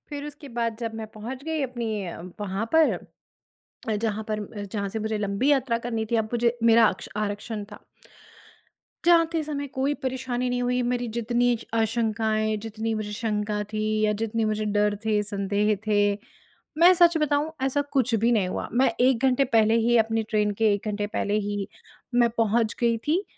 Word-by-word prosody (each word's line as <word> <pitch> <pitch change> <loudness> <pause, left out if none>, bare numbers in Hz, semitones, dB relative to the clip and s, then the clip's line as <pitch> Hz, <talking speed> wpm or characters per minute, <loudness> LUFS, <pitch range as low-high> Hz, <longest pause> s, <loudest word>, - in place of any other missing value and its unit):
फिर 290 -1 -5
उसके 295 -1 -10
बाद 230 -1 -1
जब 230 -2 -4
मैं 220 -1 -5
पहुँच 250 +5 -7
गई 320 -1 -2
अपनी 230 -6 -3
अ, 170 -1 -7 0.2
वहाँ 205 +1 -2
पर। 320 -1 +5 1.0
अ, 220 - +1
जहाँ 215 0 -2
पर 215 -1 -1
म 205 0 -7
जहाँ 200 -2 -2
से 220 - -4
मुझे 220 0 -2
लंबी 205 +7 0
यात्रा 260 -4 +2
करनी 230 -2 -3
थी, 235 - +2
अब 220 - +2
मुझे 240 0 +1
मेरा 230 0 +7
आक्क्ष 185 - -2
आरक्षण 210 +1 -3
था। - - -12 1.2
जाते 330 -1 +4
समय 285 -2 -4
कोई 275 +1 -1
परेशानी 255 -1 -2
नहीं 245 0 -1
हुई, 250 0 +1
मेरी 245 0 -1
जितनी 240 +1 +2
स 225 - -13
आशंकाएँ, 220 -1 +1
जितनी 225 +1 -4
मुझे 215 -1 -3
शंका 210 -1 -2
थी 215 0 -2 0.2
या 215 0 +3
जितने 225 0 0
मुझे 215 0 -1
डर 210 0 +1
थे, 215 -1 +2
संदेह 205 +1 0
थे। 205 -1 +3 0.6
मैं 345 +3 +8
सच 345 -2 +5
बताऊँ 300 0 +1
ऐसा 270 +2 +1
कुछ 255 -3 +2
भी 230 +2 +2
नहीं 210 -6 +2
हुआ, 185 - -3
मैं 255 +2 +4
1 255 -1 +3
घंटे 260 +1 +3
पहले 225 -2 +3
ही 235 +1 +3
अपनी 225 0 +1
ट्रेन 210 -1 +1
के 215 -2 +5
1 205 +1 -4
घंटे 205 0 -2
पहले 205 +1 0
ही 205 -1 -3 0.5
मैं 240 -1 +5
पहुँच 225 -1 +2
गई 235 -1 +3
थी 340 +6 +2
225 Hz, 185 wpm, -25 LUFS, 210-250 Hz, 1.2 s, मैं